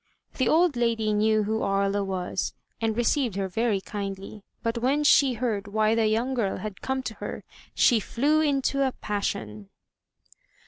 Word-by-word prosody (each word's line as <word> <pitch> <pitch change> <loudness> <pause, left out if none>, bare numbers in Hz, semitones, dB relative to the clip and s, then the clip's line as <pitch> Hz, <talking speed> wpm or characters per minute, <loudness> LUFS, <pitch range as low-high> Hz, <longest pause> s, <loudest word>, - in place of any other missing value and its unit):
The 260 - +2
old 330 -2 +4
lady 230 -3 +1
knew 215 +1 +2
who 220 +2 -1
Aria 200 0 +1
was, 185 -1 -3 0.3
and 225 -1 0
received 240 -2 +1
her 195 -1 -1
very 215 +2 0
kindly; 195 +1 -6 0.2
but 230 +1 -1
when 275 +5 +1
she 280 -2 +5
heard 215 -4 -2
why 215 +1 +2
the 225 - +2
yoimg 240 +4 0
girl 210 -6 -1
had 210 -3 -7
come 265 0 -2
to 225 - -4
her, - - -5 0.3
she 235 -3 +4
flew 290 +9 +1
into 275 -2 +1
a 265 -2 +1
passion. 110 - -3
220 Hz, 165 wpm, -26 LUFS, 200-255 Hz, 0.3 s, she